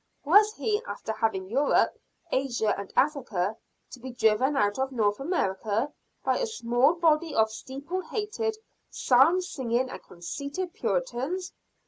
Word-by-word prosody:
Was 415 Hz, +7 st, +6 dB
he, 430 Hz, -1 st, 0 dB
after -, -, -4 dB
having 215 Hz, -4 st, -1 dB
Europe, 270 Hz, +8 st, +2 dB, 0.4 s
Asia 240 Hz, -5 st, +1 dB
and 200 Hz, -1 st, -7 dB
Africa, 225 Hz, -, +1 dB, 0.4 s
to -, -, -10 dB
be 260 Hz, +2 st, -7 dB
driven 245 Hz, +3 st, +2 dB
out 205 Hz, +1 st, +1 dB
of 265 Hz, 0 st, 0 dB
North 210 Hz, -5 st, +1 dB
America 225 Hz, -, -1 dB, 0.3 s
by -, -, +1 dB
a -, -, 0 dB
small 260 Hz, -, +2 dB
body 325 Hz, -2 st, +2 dB
of 220 Hz, 0 st, +3 dB
steeple 280 Hz, +11 st, -5 dB
hatted, 430 Hz, +4 st, -3 dB, 0.3 s
psalm 275 Hz, +9 st, +4 dB
singing, 255 Hz, -7 st, -1 dB
and -, -, -8 dB
conceited 280 Hz, -, -5 dB
Puritans? 370 Hz, -, -2 dB
270 Hz, 135 wpm, -27 LUFS, 225-345 Hz, 0.4 s, Was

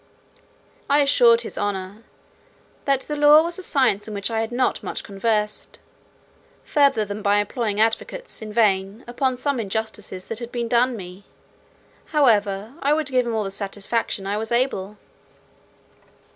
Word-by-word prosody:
I 285 Hz, +1 st, +5 dB
assured 240 Hz, -5 st, +5 dB
his 235 Hz, -, -7 dB
honour, 200 Hz, 0 st, -3 dB, 0.8 s
"that 275 Hz, -1 st, +1 dB
law 295 Hz, +1 st, +6 dB
was 340 Hz, +2 st, -4 dB
a -, -, -5 dB
science 260 Hz, -, +1 dB
in 215 Hz, -, -6 dB
which 200 Hz, +3 st, -2 dB
I 225 Hz, 0 st, 0 dB
had 225 Hz, +1 st, -3 dB
not 255 Hz, +1 st, 0 dB
much -, -, -5 dB
conversed, 210 Hz, +1 st, -2 dB, 0.9 s
further 280 Hz, -7 st, +3 dB
than 205 Hz, +1 st, -6 dB
by 205 Hz, 0 st, +3 dB
employing 205 Hz, 0 st, -1 dB
advocates, 225 Hz, -, -1 dB
in 215 Hz, -1 st, -7 dB
vain, 205 Hz, 0 st, +1 dB
upon 255 Hz, +1 st, -1 dB
some 280 Hz, 0 st, -1 dB
injustices 210 Hz, -3 st, -4 dB
that 225 Hz, -, -3 dB
had 235 Hz, -1 st, -7 dB
been 240 Hz, -1 st, -2 dB
done 245 Hz, +2 st, +2 dB
me: 185 Hz, +1 st, -10 dB, 0.8 s
however, 215 Hz, -, +2 dB
I 285 Hz, +2 st, +3 dB
would 305 Hz, -2 st, -1 dB
give 255 Hz, -2 st, +1 dB
him 230 Hz, -, -1 dB
all 220 Hz, -, 0 dB
the 195 Hz, -, -5 dB
satisfaction 200 Hz, +1 st, -3 dB
I 200 Hz, +1 st, -1 dB
was 220 Hz, +1 st, -4 dB
able." 225 Hz, -5 st, -1 dB
225 Hz, 155 wpm, -23 LUFS, 205-260 Hz, 0.9 s, law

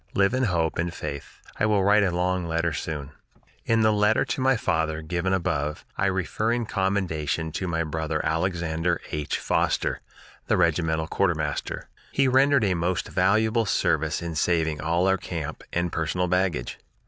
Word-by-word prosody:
Live 100 Hz, +3 st, +3 dB
in 130 Hz, 0 st, +2 dB
hope 85 Hz, -6 st, 0 dB
and 85 Hz, +1 st, 0 dB
faith. 70 Hz, 0 st, -7 dB, 0.2 s
I 110 Hz, -, +3 dB
will 105 Hz, -2 st, +2 dB
write 105 Hz, +2 st, +5 dB
a 95 Hz, -, +2 dB
long 90 Hz, 0 st, 0 dB
letter 85 Hz, 0 st, 0 dB
soon." 75 Hz, -2 st, -4 dB, 0.5 s
In 115 Hz, -1 st, +3 dB
the 110 Hz, 0 st, +4 dB
letter 105 Hz, +1 st, +3 dB
to -, -, -3 dB
my 130 Hz, -1 st, +3 dB
father, 80 Hz, -5 st, -1 dB
given 85 Hz, +3 st, -1 dB
above, 80 Hz, -5 st, -1 dB
I 95 Hz, -, +1 dB
refer 95 Hz, +4 st, 0 dB
in 120 Hz, -1 st, 0 dB
commendation 90 Hz, -6 st, -1 dB
to 95 Hz, -, -3 dB
my 85 Hz, -1 st, 0 dB
brother 80 Hz, 0 st, -2 dB
Alexander 85 Hz, 0 st, 0 dB
H. 75 Hz, -1 st, -2 dB
Foster, -, -, 0 dB, 0.5 s
the -, -, +2 dB
regimental 80 Hz, -2 st, +1 dB
quartermaster. -, -, -1 dB, 0.2 s
He 135 Hz, 0 st, +2 dB
rendered 135 Hz, 0 st, +4 dB
a 95 Hz, -3 st, +2 dB
most 85 Hz, +1 st, -1 dB
valuable 110 Hz, +4 st, +2 dB
service 80 Hz, -2 st, +1 dB
in 85 Hz, -1 st, -4 dB
saving 80 Hz, -1 st, +1 dB
all 85 Hz, +3 st, +1 dB
our 95 Hz, 0 st, +3 dB
camp 85 Hz, -4 st, -5 dB
and 85 Hz, 0 st, -1 dB
personal 85 Hz, +3 st, -1 dB
baggage. 90 Hz, -8 st, 0 dB
85 Hz, 165 wpm, -25 LUFS, 80-100 Hz, 0.5 s, write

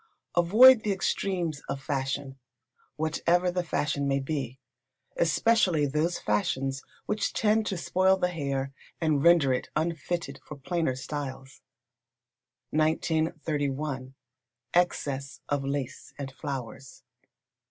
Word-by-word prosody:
Avoid 220 Hz, +8 st, +8 dB
the 210 Hz, -, -1 dB
extremes 180 Hz, -5 st, -1 dB
of 135 Hz, -, -2 dB
fashion, 135 Hz, 0 st, -3 dB, 0.6 s
whatever 170 Hz, +3 st, +1 dB
the 180 Hz, 0 st, 0 dB
fashion 150 Hz, -3 st, -1 dB
may 140 Hz, 0 st, +1 dB
be, 135 Hz, -3 st, -3 dB, 0.6 s
especially 175 Hz, -2 st, +3 dB
those 155 Hz, +5 st, 0 dB
fashions 135 Hz, +6 st, -1 dB, 0.2 s
which 210 Hz, 0 st, -1 dB
tend 215 Hz, 0 st, +2 dB
to 190 Hz, -, -2 dB
spoil 185 Hz, +2 st, +2 dB
the 180 Hz, -1 st, +1 dB
hair 140 Hz, -5 st, -3 dB, 0.3 s
and 155 Hz, -4 st, +1 dB
render 170 Hz, -6 st, +5 dB
it 125 Hz, -, -3 dB
unfitted 165 Hz, +1 st, -2 dB
for 150 Hz, -, -9 dB
plainer 160 Hz, -1 st, -1 dB
styles. 135 Hz, -1 st, -6 dB, 1.1 s
1931. 155 Hz, -4 st, -1 dB, 0.6 s
Excess 140 Hz, -6 st, 0 dB
of 145 Hz, -1 st, -1 dB
Lace 135 Hz, -1 st, -4 dB
and 135 Hz, -1 st, -5 dB
Flowers. 135 Hz, -2 st, -7 dB
150 Hz, 110 wpm, -28 LUFS, 135-175 Hz, 1.1 s, Avoid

